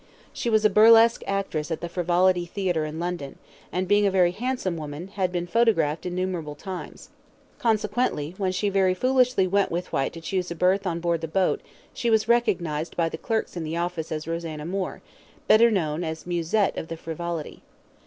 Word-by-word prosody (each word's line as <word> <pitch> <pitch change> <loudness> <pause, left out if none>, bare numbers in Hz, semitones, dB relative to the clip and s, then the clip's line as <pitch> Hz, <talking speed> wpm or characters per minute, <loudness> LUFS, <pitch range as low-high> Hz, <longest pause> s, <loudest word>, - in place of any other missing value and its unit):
She 235 - -2
was 220 -1 +3
a - - +7
burlesque 230 +2 +6
actress 195 -6 -2
at 160 - -2
the 170 - -4
Frivolity 175 +1 +2
Theatre 175 -4 -1
in 155 +1 -6
London, 170 -5 -4 0.3
and, 185 +1 -1
being 205 +1 +4
a - - +4
very 185 -2 +3
handsome 235 -3 -2
woman, 155 +3 -6
had 190 -2 -1
been 175 -1 -2
photographed 175 -7 +1
innumerable 180 -4 -3
times. 185 +4 -8 0.5
Consequently, 210 - 0
when 190 -2 +1
she 185 +3 -1
very 190 -2 +2
foolishly 255 -2 +3
went 200 +1 +1
with 175 +1 -4
Whyte 135 - 0
to 165 - -8
choose 180 +2 -2
a 170 - -4
berth 185 +3 +2
on 170 -1 -2
board 170 -1 0
the 165 - -3
boat, 185 +3 +1 0.3
she 235 - -1
was 220 -1 +3
recognised 175 -10 0
by 165 -1 +2
the 160 - -6
clerks 225 -4 -2
in 170 - -3
the 160 +1 -3
office 170 -2 -3
as 155 0 -4
Rosanna 165 -2 -4
Moore, 185 +2 -4 0.4
better 230 +2 +6
known 165 -6 -1
as 160 -1 -5
Musette 175 +4 0
of - - -6
the 165 0 -6
Frivolity. 165 -1 -5
180 Hz, 190 wpm, -25 LUFS, 165-200 Hz, 0.5 s, a